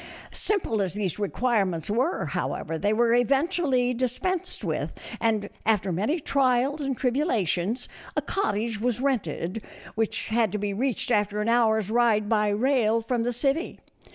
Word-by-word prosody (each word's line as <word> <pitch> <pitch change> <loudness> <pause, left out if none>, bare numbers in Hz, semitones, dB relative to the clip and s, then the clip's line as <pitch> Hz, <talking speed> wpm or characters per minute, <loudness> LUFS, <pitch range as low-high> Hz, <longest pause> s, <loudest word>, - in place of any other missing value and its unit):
Simple 355 - 0
as 190 -1 -2
these 205 -3 -2
requirements 200 -6 0
were, 250 - 0
however, 165 - -3
they 205 +4 +1
were 230 +1 +3
eventually 265 - +2
dispensed 255 +9 -2
with, - - -2 0.3
and, 220 -3 +1 0.2
after 205 -4 +1
many 215 - 0
trials 275 +1 +1
and 270 -3 -2
tribulations, 245 - 0 0.3
a - - +3
cottage 220 - -1
was 245 -1 0
rented, 220 - -1 0.3
which 220 -2 -2
had 220 -2 +2
to - - 0
be 205 0 -2
reached 250 +3 -1
after 210 -1 +1
an 210 +2 0
hour's 220 -3 +2
ride 225 -3 +3
by 210 -1 +2
rail 230 0 +2
from 235 +1 -1
the 240 +1 0
city. 275 +7 -1
230 Hz, 150 wpm, -26 LUFS, 210-255 Hz, 0.3 s, were